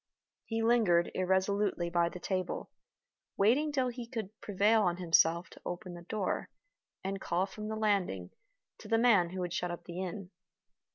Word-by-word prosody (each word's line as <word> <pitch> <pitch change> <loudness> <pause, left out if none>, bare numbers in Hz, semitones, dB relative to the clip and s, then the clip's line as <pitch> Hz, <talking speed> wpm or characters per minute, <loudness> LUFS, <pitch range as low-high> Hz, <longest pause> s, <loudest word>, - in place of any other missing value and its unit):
He 225 0 -1
lingered 215 -8 +3
irresolutely 190 -1 +1
by 170 0 +2
the 180 - -8
table, 185 0 -3 0.7
waiting 260 +10 +3
till 260 -3 +1
he 240 -1 -7
could 225 -5 -5
prevail 210 +2 +3
on 175 -3 +1
himself 170 0 +3
to - - -14
open 175 0 -5
the 175 - -9
door, 195 +2 -2 0.5
and 195 0 -3
call 175 +2 0
from 210 +2 -7
the 220 - -3
landing, 195 - 0 0.5
to - - -11
the 225 - +3
man 220 -7 +5
who 185 +1 -4
had 175 -1 -3
shut 180 0 -1
up 175 0 -6
the 175 +1 -6
inn. 185 0 -5
190 Hz, 170 wpm, -32 LUFS, 175-220 Hz, 0.7 s, man